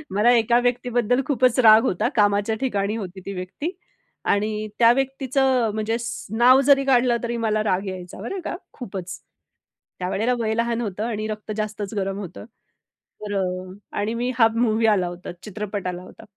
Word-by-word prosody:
मला 225 Hz, +4 st, +5 dB
एका 235 Hz, +2 st, +3 dB
व्यक्तीबद्दल 245 Hz, 0 st, +1 dB
खूपच 255 Hz, -2 st, +2 dB
राग 220 Hz, -2 st, +7 dB
होता. 215 Hz, +3 st, 0 dB
कामाच्या 205 Hz, +1 st, +2 dB
ठिकाणी 205 Hz, -5 st, -1 dB
होती 190 Hz, -3 st, -7 dB
ती 200 Hz, -, -5 dB
व्यक्ती 185 Hz, -, -5 dB, 0.5 s
आणि 215 Hz, +1 st, 0 dB
त्या 230 Hz, 0 st, +7 dB
व्यक्तीचं 265 Hz, -3 st, +1 dB
म्हणजे 220 Hz, +1 st, -1 dB
स 235 Hz, -, -5 dB
नाव 255 Hz, +3 st, +6 dB
जरी 275 Hz, -1 st, +6 dB
काढलं 245 Hz, -2 st, +3 dB
तरी 235 Hz, 0 st, -2 dB
मला 215 Hz, 0 st, +1 dB
राग 195 Hz, -2 st, 0 dB
यायचा. 185 Hz, 0 st, -7 dB
बरं 375 Hz, -, -4 dB
का, -, -, -3 dB, 0.2 s
खूपच. 190 Hz, -7 st, -7 dB, 0.8 s
त्यावेळेला 200 Hz, +7 st, 0 dB
वय 220 Hz, -1 st, 0 dB
लहान 235 Hz, +1 st, 0 dB
होतं 210 Hz, -1 st, -3 dB
आणि 215 Hz, -2 st, -3 dB
रक्त 215 Hz, 0 st, -6 dB
जास्तच 215 Hz, 0 st, -4 dB
गरम 195 Hz, 0 st, -2 dB
होतं. 190 Hz, 0 st, -8 dB, 0.8 s
तर 205 Hz, -1 st, -4 dB
अ, -, -, +1 dB, 0.6 s
आणि 210 Hz, +2 st, -1 dB
मी 245 Hz, +1 st, 0 dB
हा 225 Hz, -, +7 dB
मूव्ही 225 Hz, -1 st, +2 dB
आला 190 Hz, -5 st, +3 dB
होता. 175 Hz, +1 st, -7 dB
चित्रपट 205 Hz, -2 st, -5 dB
आला 180 Hz, 0 st, -4 dB
होता. 185 Hz, -, -14 dB
220 Hz, 170 wpm, -23 LUFS, 200-240 Hz, 0.8 s, राग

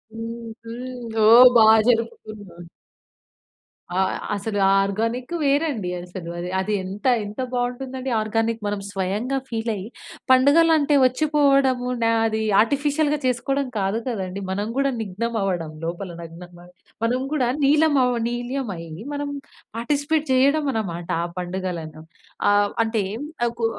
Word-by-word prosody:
హ్మ్. 230 Hz, +1 st, -6 dB, 0.2 s
హ్మ్. 240 Hz, 0 st, -7 dB
ఓహ్! 240 Hz, +3 st, +10 dB
బా 220 Hz, -, +7 dB, 0.2 s
జరుపుకున్నాం. 215 Hz, -6 st, -2 dB, 1.3 s
ఆ! -, -, +2 dB, 0.4 s
అసలు 205 Hz, +1 st, -3 dB
ఆ -, -, +4 dB
ఆర్గానిక్ 230 Hz, -, -2 dB
వేరండి 280 Hz, -, 0 dB
అసలు. 175 Hz, -1 st, -8 dB, 0.3 s
అది 200 Hz, +3 st, -1 dB
ఎంత, 195 Hz, +5 st, -8 dB, 0.2 s
ఎంత 205 Hz, +4 st, -6 dB
బావుంటుందండి 255 Hz, +1 st, -3 dB
ఆర్గానిక్ 225 Hz, +1 st, -1 dB
మనం 205 Hz, 0 st, -2 dB
స్వయంగా 200 Hz, +8 st, -2 dB
ఫీల్ 225 Hz, 0 st, -2 dB
అయ్యి 195 Hz, 0 st, -6 dB, 0.4 s
పండుగలు 285 Hz, +6 st, +5 dB
అంటే 290 Hz, -1 st, +2 dB
వచ్చిపోవడము 275 Hz, -2 st, +2 dB, 0.2 s
న -, -, +3 dB, 0.2 s
అది 220 Hz, 0 st, -2 dB, 0.2 s
ఆర్టిఫిషియల్‌గా 290 Hz, +4 st, +1 dB
చేసుకోవడం 270 Hz, +2 st, 0 dB
కాదు 195 Hz, +3 st, 0 dB
కదండీ. 195 Hz, -5 st, -4 dB
మనం 205 Hz, +2 st, -2 dB
కూడా 275 Hz, 0 st, +2 dB
నిగ్నం 220 Hz, +3 st, -3 dB
అవ్వడం 175 Hz, -5 st, -2 dB
లోపల 175 Hz, +3 st, -4 dB
నగ్న 165 Hz, 0 st, -10 dB, 0.2 s
న 175 Hz, -, -14 dB, 0.4 s
మనం 240 Hz, +2 st, +1 dB
కూడా 265 Hz, -5 st, +1 dB, 0.2 s
నీలం 300 Hz, +2 st, +4 dB
అవ్వ 250 Hz, -1 st, +1 dB
నీల్యమై 240 Hz, -6 st, -4 dB, 0.3 s
మనం 290 Hz, 0 st, -3 dB, 0.5 s
పార్టిసిపేట్ 290 Hz, +5 st, 0 dB
చేయడం 280 Hz, +4 st, +3 dB
అన్నమాట 175 Hz, -6 st, -4 dB, 0.2 s
ఆ -, -, -1 dB
పండుగలను. 175 Hz, -3 st, -5 dB, 0.5 s
ఆహ్, 205 Hz, 0 st, +3 dB
అంటే 220 Hz, -2 st, -1 dB, 0.4 s
అ -, -, +2 dB
కు 230 Hz, -, +1 dB
230 Hz, 130 wpm, -23 LUFS, 200-265 Hz, 1.3 s, ఓహ్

